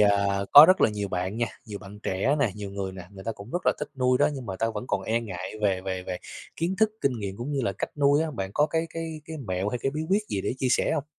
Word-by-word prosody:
à, 105 -1 +6 0.4
có 145 +2 +12
rất 185 +1 +5
là - - +5
nhiều 105 -1 -3
bạn 95 +2 -2
nha, 120 0 +1 0.2
nhiều 105 -2 -6
bạn 100 0 -11
trẻ 100 +10 +1
nè, 130 -7 +2
nhiều 105 -1 -6
người 95 -1 -4
nè, 95 - -8
người 95 -1 -11
ta 115 - -1
cũng 105 +2 -11
rất 175 - -3
là - - +6
thích 150 - -4
nuôi 125 0 +3
đó - - +4
nhưng 130 -4 -7
mà 95 - -4
ta 115 - 0
vẫn 105 - -4
còn - - -1
e 115 +1 0
ngại 95 -5 -6
về 95 -3 +2
về 95 -1 -4
về 90 -1 -4 0.4
kiến 170 +3 0
thức, 220 0 +4
kinh 140 - +2
nghiệm 100 -2 -4
cũng 125 +6 -4
như 140 - 0
là 115 - 0
cách 95 - -4
nuôi 145 +1 +4
á, 160 - -2
bạn 95 -9 -4
có 150 - +4
cái 160 +2 -1
cái 165 -1 -5
cái 160 0 -7
mẹo 95 +2 -1
hay 125 - -2
cái 135 - -1
bí 150 +2 -4
quyết 200 +3 +3
gì 100 - -1
để - - -2
chia 130 - +1
sẻ - - +2
hông? 145 - -1
115 Hz, 305 wpm, -26 LUFS, 95-145 Hz, 0.4 s, có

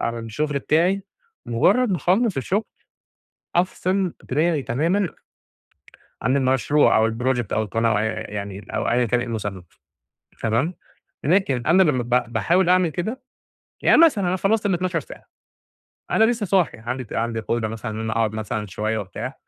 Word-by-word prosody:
على 115 0 -2
الشغل 140 +6 -2
بتاعي 175 +8 +1 0.4
مجرّد 200 - +3
ما 185 - +1
أخلّص 195 - +1
الشغل، 190 - 0 0.9
أفصل 185 +1 0
دماغي 155 +2 +1
تمامًا، 170 - 0 1.1
عن 130 +4 +2
المشروع 135 +2 +3
أو 110 +1 +3
الproject 120 -1 -1
أو 110 - +1
القناة 115 +2 0
أو 105 - +2
ي - - 0
يعني 100 -2 -6
أو - - 0
أيًا 120 +1 +3
كان 120 +2 +1
إيه 120 - -4
المسمى، 105 -5 -4 0.8
تمام، 120 +11 0 0.5
لكن 150 -7 +2
أنا 180 +4 +5
لمّا 145 -8 +2
ب 120 -1 0
باحاول 170 +10 +2
أعمل 185 -1 +4
كده، 220 - -4 0.6
يعني - - +5
مثلًا 215 - +4
أنا 185 - +1
خلّصت 205 +2 +1
ال12 185 -1 0
ساعة، - - -13 0.9
أنا 220 - +4
لسّه 230 -2 +1
صاحي 190 -3 +1
عندي 125 +4 -4
ت 115 - -11
عندي 115 0 -1
قدرة 110 0 -1
مثلًا 110 +1 -5
إن 110 - -5
أنا 110 0 -3
أقعد 110 -2 0
مثلًا 110 -1 -3
شوية 110 +4 -2
وبتاع، 95 -4 -5
130 Hz, 160 wpm, -22 LUFS, 115-185 Hz, 1.1 s, أنا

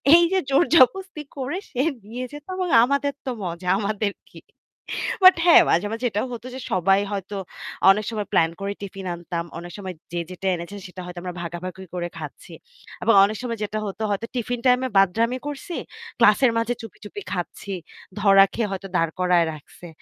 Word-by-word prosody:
এই 345 - +7
যে 380 - +4
জোরজবস্তি 330 +3 +4 0.2
করে 280 +6 -3
সে 255 - -1 0.3
নিয়ে 250 +2 -4
যেত 295 0 -9
এবং 365 -1 -1
আমাদের 280 +2 +1
তো 260 - -1
মজা। 175 +1 -5
আমাদের 210 0 -1 0.2
কি? - - -13 0.8
বাট 370 0 +10
হ্যাঁ 345 - +9
মাঝে, 175 +5 +3
মাঝে 230 +3 -3
এটাও 210 +5 -1
হত 235 - -7
যে - - -6
সবাই 195 +2 +3
হয়তো 200 0 -4 0.6
অনেক 210 +2 0
সময় 210 -3 -3
প্ল্যান 165 0 +4
করে 200 0 -2
টিফিন 195 -1 -7
আনতাম। 170 0 -4
অনেক 175 +1 -8
সময় 190 -2 -6 0.2
যে 175 - -1
যেটা 185 +1 -5
এনেছে 170 +4 -7
সেটা 185 0 -9
হয়তো 180 0 -7
আমরা 180 -1 -4
ভাগাভাগি 180 +2 -6
করে 175 -1 -2
খাচ্ছি। - - -9 0.5
এবং 230 - +4
অনেক 210 +2 -3
সময় 235 -2 -3
যেটা 215 +1 -2
হতো 195 +1 -7
হয়তো 200 +3 -1
টিফিন 245 0 -2
টাইমে 250 +1 +4
বাদরামি 225 +6 +3
করছি, 310 +5 -5 0.4
ক্লাসের 235 +2 +5
মাঝে 230 +1 +1
চুপি, 225 -4 -10
চুপি 310 - -7
খাচ্ছি। 185 +2 -5 0.5
ধরা 195 -1 +7
খেয়ে 225 -3 -1
হয়তো 195 0 -5
দাঁড় 165 -1 +1
করায় 180 -2 +4
রাখছে। 155 +3 -13
205 Hz, 180 wpm, -23 LUFS, 185-250 Hz, 0.8 s, বাট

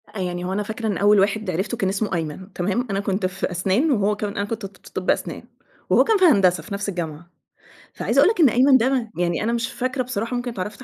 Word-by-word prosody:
يعني 180 -2 -3
هو 185 - -2
أنا 210 +2 -1
فاكرة 220 +2 -4
إن 205 - -1
أول 205 0 +4
واحد 205 +1 0
عرفته 190 +7 -2
كان 190 - 0
اسمه 195 +1 -2
أيمن، 170 +4 -5
تمام؟ 205 +8 -1
أنا 195 - 0
كنت 195 -1 -1
في 185 0 -3
أسنان 195 - +1
وهو 210 -4 +2
كان 210 -1 -4
أنا 200 - 0
ك - - -13
كنت 225 -2 -4
ت 195 - -13
في - - -16
طب - - -3
أسنان، - - -1 0.5
وهو - - +5
كان 445 -2 +2
في 375 - +4
هندسة 185 - +4
في 190 - -8
نفس 200 +1 -3
الجامعة، 170 -2 -5 0.6
فعايزة - - 0
أقول - - +6
لَك 440 - -6
إن 300 -6 +7
أيمن 260 +3 +5
ده، 250 -2 0
يعني 175 +1 0
أنا 230 +2 0
مش 230 0 -2
فاكرة 255 +1 -2
بصراحة 240 -1 -3
ممكن 245 0 -3
اتعرفت 210 +3 -6
205 Hz, 250 wpm, -22 LUFS, 185-235 Hz, 0.6 s, إن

